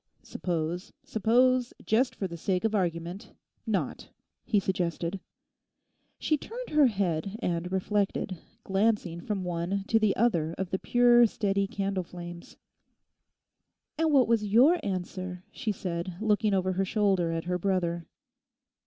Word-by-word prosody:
'Suppose, 175 +1 -3
suppose, 245 +3 +2
just 240 +4 +2
for 195 - -2
the 170 - -7
sake 180 +2 -1
of 225 -1 +1
argument—not,' 175 -1 -3 0.3
he 210 - +2
suggested. 180 -1 -2 1.0
She 305 - +1
turned - - -7
her 300 -2 +6
head 195 -3 -1
and 180 -5 -2
reflected, 195 -1 -1 0.2
glancing 195 -4 0
from 195 0 -3
one 180 +3 -2
to 225 - +4
the 215 -3 +2
other 170 -8 +1
of 190 -2 -3
the 190 - 0
pure, 240 -1 +5
steady 200 -2 0
candle 195 -3 -2
flames. 175 0 -10 1.4
'And 325 -1 +3
what 270 -4 +5
was 230 -2 +2
your 250 - +5
answer?' 185 -1 -4
she 220 - -2
said, 175 -2 -4
looking 215 -1 +2
over 185 0 +1
her 190 +2 +1
shoulder 190 -4 +1
at 165 0 -2
her 180 +1 -2
brother. 175 -3 -1
195 Hz, 135 wpm, -28 LUFS, 175-220 Hz, 1.4 s, her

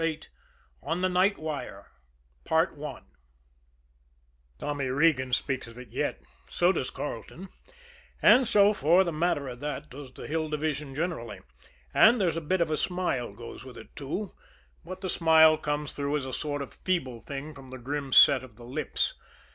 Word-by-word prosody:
VIII 160 -1 -1 0.6
ON 165 +3 -2
THE 185 - +2
NIGHT 185 +3 +3
WIRE 145 -10 -6 0.6
Tommy 150 -4 -1 1.8
Regan 130 -1 +2
speaks 130 0 -1
of 115 0 -13
it 125 0 -10
yet; - - -2 0.3
so 175 +1 +3
does 130 - -2
Carleton; 145 - -7 0.7
and 255 -1 +6
so, 205 0 +5
for 175 +1 +4
the 170 - -2
matter 155 -3 0
of 125 -1 -7
that, 150 +1 -5
does 135 0 -9
the - - -10
Hill 160 0 -2
Division 150 -2 -3
generally 150 -9 -3 0.5
and 235 +1 +6
there's 175 -5 +1
a 165 - -2
bit 175 +4 0
of 165 - +1
a 155 - +1
smile 175 - -1
goes 115 +3 -10
with 130 -1 -11
it, - - -13
too, 180 +9 -4 0.5
but 185 +2 -8
the 190 - -3
smile 160 -2 +6
comes 150 -1 -3
through 145 +1 -1
as 140 - -4
a 130 - -6
sort 145 -1 -3
of 135 - -11
feeble 130 -11 -2
thing 145 +2 -7
from 135 -2 -13
the 130 0 -8
grim 140 +2 -4
set 130 0 +7
of 120 -4 -13
their 120 +1 -13
lips. 125 - -2
150 Hz, 170 wpm, -28 LUFS, 130-170 Hz, 1.8 s, set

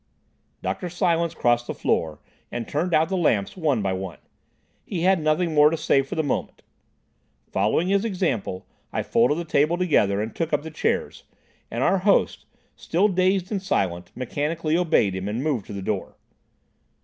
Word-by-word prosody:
Dr. 180 - -3
Silence 170 -2 0
crossed 120 -2 +1
the - - -4
floor 80 -2 0 0.3
and 120 -1 -4
turned 165 +5 -1
out 160 0 +3
the 190 - -2
lamps 115 - +1
one 150 - 0
by 95 -1 0
one. 95 -2 -5 0.7
He 180 -4 -4
had 185 +1 +4
nothing 155 +2 +1
more 150 0 +6
to 165 - -2
say 150 -3 +3
for 135 - -6
the 160 - 0
moment. 145 - -3 0.9
Following 105 - +1
his 200 +1 +2
example, 170 - -2 0.3
I - - -2
folded 125 +6 +2
the 170 - -3
table 155 +2 +2
together 125 - +2
and 110 +1 -4
took 165 -1 -2
up 145 0 +1
the 160 - -7
chairs, 155 - -2 0.4
and 120 +3 -2
our 195 - +3
host, 200 +2 +2 0.3
still 190 +6 +1
dazed 185 0 +1
and 200 -3 -1
silent, 90 - -1
mechanically 155 +5 -2
obeyed 165 - +2
him 95 +1 -4
and 110 +5 -2
moved 140 -9 -1
to - - -7
the 100 -1 -5
door. - - -3
155 Hz, 175 wpm, -24 LUFS, 115-175 Hz, 0.9 s, more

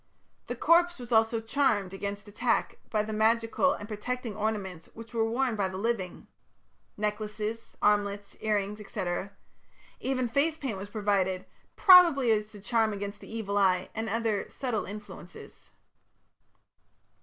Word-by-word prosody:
The 245 - -3
corpse 345 +6 +4
was 245 -2 -9
also 225 0 +3
charmed, 225 -5 +1
against 200 +1 -5
attack, 230 +4 0
by 215 -1 +1
the 215 0 -5
magical 225 +5 +2
and 205 - -7
protecting 230 +1 -4
ornaments 200 -5 -3
which 230 +1 -11
were 225 -1 +1
worn 245 0 0
by 200 -2 0
the 185 0 -6
living 200 -3 -2 0.7
necklaces, 210 +1 -3
armlets, 205 -1 +1
ear 215 -1 +1
rings, 205 +1 -2
&c. 210 -5 -3 0.9
Even 255 -2 -1
face 290 +7 +1
paint 250 -10 -4
was 200 +1 -7
provided, 200 -4 0 0.3
probably 340 - +7
as 215 0 0
a - - -9
charm 220 0 +1
against 200 0 -5
the - - -12
evil 205 -3 -1
eye 185 -2 +2
and 220 0 -3
other 225 -3 -1
subtle 245 -6 -2
influences. 200 -3 -11
215 Hz, 145 wpm, -29 LUFS, 205-235 Hz, 0.9 s, probably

